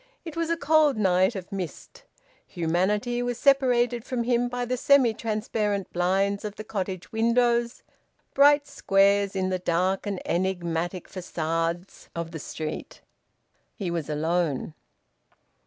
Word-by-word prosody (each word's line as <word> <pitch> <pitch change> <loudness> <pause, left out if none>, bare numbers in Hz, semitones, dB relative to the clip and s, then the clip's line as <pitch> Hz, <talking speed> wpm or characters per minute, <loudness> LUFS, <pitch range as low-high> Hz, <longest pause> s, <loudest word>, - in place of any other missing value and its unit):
It 325 - -7
was 330 0 -1
a 335 - +1
cold 305 -3 +3
night 190 +1 +3
of 190 0 -7
mist. 185 -6 -7 0.4
Humanity 200 +8 0
was 245 -1 -2
separated 245 -3 +3
from 250 -2 -2
him 245 0 +1
by 245 0 -3
the 250 +1 -1
semi 255 -2 +4
transparent 210 -3 -2
blinds 195 +3 +1
of 210 -1 -5
the 215 - -7
cottage 190 -4 -5
windows, 235 +1 +1 0.5
bright 285 +1 +5
squares 200 -6 +2
in 185 -1 0
the 185 -1 -1
dark 185 +3 0
and 200 -2 -2
enigmatic 175 -1 -2
facades 170 0 -3
of 170 -1 -4
the 160 - -6
street. 155 +1 -6 0.7
He 190 -6 -3
was 165 -4 -3
alone. 155 -1 -1
200 Hz, 135 wpm, -26 LUFS, 175-240 Hz, 0.7 s, bright